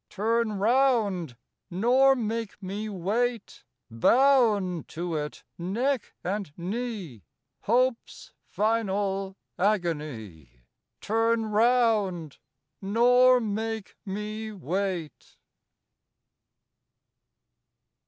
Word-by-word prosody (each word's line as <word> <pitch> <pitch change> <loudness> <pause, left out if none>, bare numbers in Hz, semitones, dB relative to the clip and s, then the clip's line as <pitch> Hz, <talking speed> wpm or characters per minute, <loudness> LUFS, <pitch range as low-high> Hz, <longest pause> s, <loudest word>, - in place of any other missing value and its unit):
Turn 225 +2 0
round! 210 - +1 0.3
nor 250 +9 +4
make 225 -3 -3
me 205 +3 -4
wait, 215 +5 -2 0.3
Bound 210 - +3
to 170 0 -4
it 150 -1 -5 0.2
neck 235 +8 -2
and 195 -3 -3
knee, 190 - -5 0.4
Hope's 245 +2 -1
final 200 -3 -1 0.2
agony! 140 - -2 0.4
Turn 225 +1 +1
round! 215 - +1 0.4
nor 245 +5 +5
make 220 -1 -4
me 215 +2 -5
wait. 185 -2 -4
210 Hz, 70 wpm, -27 LUFS, 180-230 Hz, 0.4 s, nor